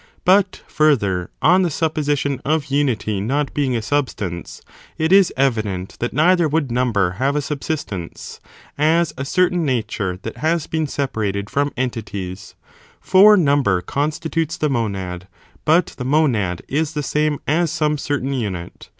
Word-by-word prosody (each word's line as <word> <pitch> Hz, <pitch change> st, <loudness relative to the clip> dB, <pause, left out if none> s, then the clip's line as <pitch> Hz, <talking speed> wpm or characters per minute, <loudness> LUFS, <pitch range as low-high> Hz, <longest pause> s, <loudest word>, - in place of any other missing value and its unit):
But, 190 Hz, +1 st, +3 dB
further, 100 Hz, -, +1 dB
on 180 Hz, +4 st, +5 dB
the 180 Hz, -, +1 dB
supposition 145 Hz, -3 st, -1 dB
of 155 Hz, +1 st, +1 dB
imity 115 Hz, -8 st, 0 dB
not 140 Hz, +7 st, -1 dB
being 135 Hz, -4 st, 0 dB
a 115 Hz, -, -2 dB
substance, 105 Hz, -, -3 dB, 0.3 s
it 160 Hz, +2 st, 0 dB
is 195 Hz, -2 st, +6 dB
evident 110 Hz, -8 st, -1 dB
that 120 Hz, -, -2 dB
neither 170 Hz, +3 st, +3 dB
would 150 Hz, -4 st, -1 dB
number 115 Hz, -7 st, +1 dB
have 140 Hz, +2 st, +1 dB
a -, -, +2 dB
subsistence, 140 Hz, -, -5 dB, 0.4 s
as 160 Hz, +2 st, +2 dB
a 135 Hz, -, -4 dB
certain 180 Hz, +4 st, +1 dB
nature 110 Hz, -, -2 dB
that -, -, -6 dB
has 160 Hz, 0 st, 0 dB
been 160 Hz, -1 st, -2 dB
separated 105 Hz, -8 st, -2 dB
from 145 Hz, +1 st, 0 dB
entities, 105 Hz, -6 st, -5 dB, 0.4 s
for 205 Hz, +3 st, +6 dB
number 140 Hz, -, +3 dB
constitutes 155 Hz, -, -2 dB
the 150 Hz, -, 0 dB
monad; 95 Hz, -7 st, -3 dB, 0.4 s
but 165 Hz, +3 st, +3 dB
the -, -, -2 dB
monad 125 Hz, -, +1 dB
is 155 Hz, +2 st, -1 dB
the 150 Hz, -2 st, -2 dB
same 150 Hz, +1 st, 0 dB
as 165 Hz, +3 st, +1 dB
some 150 Hz, -2 st, 0 dB
certain 140 Hz, -1 st, -2 dB
unit. 95 Hz, -9 st, -5 dB
140 Hz, 145 wpm, -20 LUFS, 110-155 Hz, 0.4 s, is